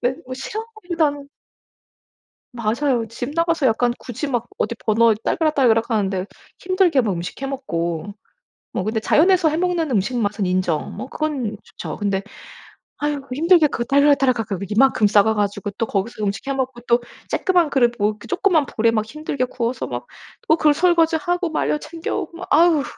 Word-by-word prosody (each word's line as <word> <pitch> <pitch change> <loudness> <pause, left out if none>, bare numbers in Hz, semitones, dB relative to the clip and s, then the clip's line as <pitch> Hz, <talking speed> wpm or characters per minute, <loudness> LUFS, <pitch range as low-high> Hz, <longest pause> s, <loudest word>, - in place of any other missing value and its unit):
근데 250 +1 0
뭐 255 0 -6
싫어하기보다는 340 - -3 1.2
맞아요. 235 +1 0
집 245 +4 -5
나가서 330 -3 +1
약간 240 +1 +2
굳이 260 +4 -5
막 240 -2 -1
어디 235 - -1
버너 225 +1 +4
딸그락 315 -2 +1
딸그락 235 -3 +3
하는데 195 -4 0 0.3
힘들게 370 -6 +2
막 215 -5 0
음식 175 +8 -6
해 270 - -1
먹고 175 - -3 0.6
뭐 185 - -1
근데 220 +2 -1
자연에서 350 - +4
해 305 - -1
먹는 350 -3 0
음식 230 +3 0
맛은 205 -2 -1
인정. 180 -3 -1
뭐 - - -5
그건 275 -8 -3
좋죠. - - -8
근데 200 -2 -1 0.8
아휴 295 -1 -2
힘들게 330 +3 +4
그 235 -4 -3
딸그락 280 +2 +4
딸그락 250 -5 +1
그 200 -4 -3
이만큼 225 0 +3
싸가 210 +1 +4
가지고 205 0 -1
또 230 - 0
거기서 215 +1 -3
음식 200 +5 -3
해 275 - 0
먹고 260 -2 -3
또 235 +1 +4 0.3
쪼끄만 355 -4 +2
그릇 255 -4 +3
보 210 -1 0
쪼끄만 365 -6 +2
볼에 230 +1 +3
막 215 -2 0
힘들게 280 +1 -3
구워서 245 -1 -3
막 120 0 -6 0.4
또 315 - +5
그 305 -3 +4
설거지하고 345 +1 +2
말려 305 - 0
챙겨 320 +3 -5
오고 335 - -5
막 365 - -8
아휴. 320 -1 +5
255 Hz, 345 characters per minute, -21 LUFS, 215-310 Hz, 1.2 s, 또